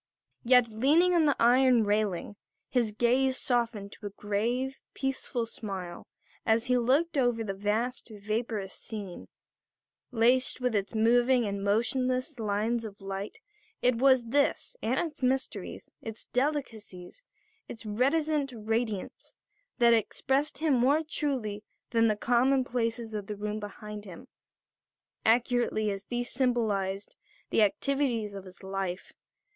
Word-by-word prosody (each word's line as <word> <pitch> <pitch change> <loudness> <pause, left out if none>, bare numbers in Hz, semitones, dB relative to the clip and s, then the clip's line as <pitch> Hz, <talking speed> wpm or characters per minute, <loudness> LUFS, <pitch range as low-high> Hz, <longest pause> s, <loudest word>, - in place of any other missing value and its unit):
Yet, 245 -1 +5
leaning 295 +11 +3
on 335 -3 +4
the 285 - +3
iron 245 0 +5
railing, 205 -2 0 0.4
his 240 -4 +1
gaze 255 +4 +2
softening 230 -5 -1
to 210 - -8
a - - -5
grave, 230 +7 -2 0.2
peaceful 265 -3 -2
smile 190 -6 -7 0.4
as 225 +1 +2
he 250 - +2
looked 280 +6 +2
over 245 -3 +1
the 200 -3 -3
vast, 215 +6 -2
vaporous 215 -1 -3
scene, 205 -5 -7 0.8
laced 250 +2 +3
with 250 -2 0
its 205 +1 -1
moving 240 +2 +4
and 200 -1 -3
motionless 255 +6 0
lines 220 +2 0
of 210 -2 -8
light, 195 - -5 0.5
it 250 -1 +3
was 260 -2 +4
this, 280 +3 +1
and 240 +4 0
its 310 -5 -4
mysteries, 265 +2 -2
its 225 -1 -6
delicacies, 250 - -3 0.4
its 230 - -9
reticent 275 +6 +1
radiance, 220 -2 -3 0.4
that 235 -1 +6
expressed 265 +6 0
him 310 -1 +1
more 270 +5 +3
truly 245 -10 -2 0.3
than 230 -1 +4
the 215 - +2
commonplaces 240 -1 +1
of 205 -2 -4
the 210 - -4
room 210 +1 -3
behind 210 0 -8
him, 180 -4 -11 1.0
accurately 235 -2 +2
as 195 0 -6
these 245 +1 -3
symbolized 210 -6 0 0.4
the - - +3
activities 235 -1 +1
of 195 -1 -8
his 185 +1 -14
life. 190 -1 -4
230 Hz, 130 wpm, -29 LUFS, 210-255 Hz, 1.0 s, that